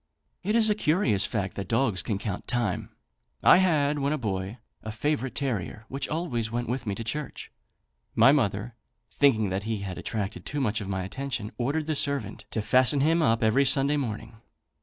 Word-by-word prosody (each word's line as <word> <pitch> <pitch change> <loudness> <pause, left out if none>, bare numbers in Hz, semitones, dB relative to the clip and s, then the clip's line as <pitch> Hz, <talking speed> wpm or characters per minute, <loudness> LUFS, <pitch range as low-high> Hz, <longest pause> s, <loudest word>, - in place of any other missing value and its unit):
It 210 +4 -1
is 225 -2 +6
a 210 - +5
curious 150 - +1
fact 100 -5 -3
that 100 - -4
dogs 115 -6 +1
can 100 +2 -2
count 100 -2 -5
time. 120 -6 -1 0.5
I - - +8
had, 150 -6 +2
when 140 +1 0
a - - 0
boy, 100 -3 -3 0.2
a 110 - -6
favourite 135 +3 -2
terrier, 110 - -3
which 135 +1 -4
always 130 -9 -2
went 120 +1 -2
with 125 0 -3
me 100 - -1
to 115 - -5
church. 150 +6 -5 0.6
My 135 - +7
mother, 115 -4 0 0.4
thinking 110 -8 +3
that 95 +1 -1
he 105 -3 -2
attracted 100 +2 -4
too 145 - -4
much 115 -3 0
of 100 - -6
my 95 -1 -2
attention, 125 +1 -4
ordered 145 +6 -1
the 155 - -1
servant 140 -8 -2
to 110 - -3
fasten 130 +4 +4
him 165 +3 +3
up 115 -5 +2
every 110 +6 +4
Sunday 140 +2 +3
morning. 115 -5 -4
120 Hz, 185 wpm, -27 LUFS, 105-145 Hz, 0.6 s, I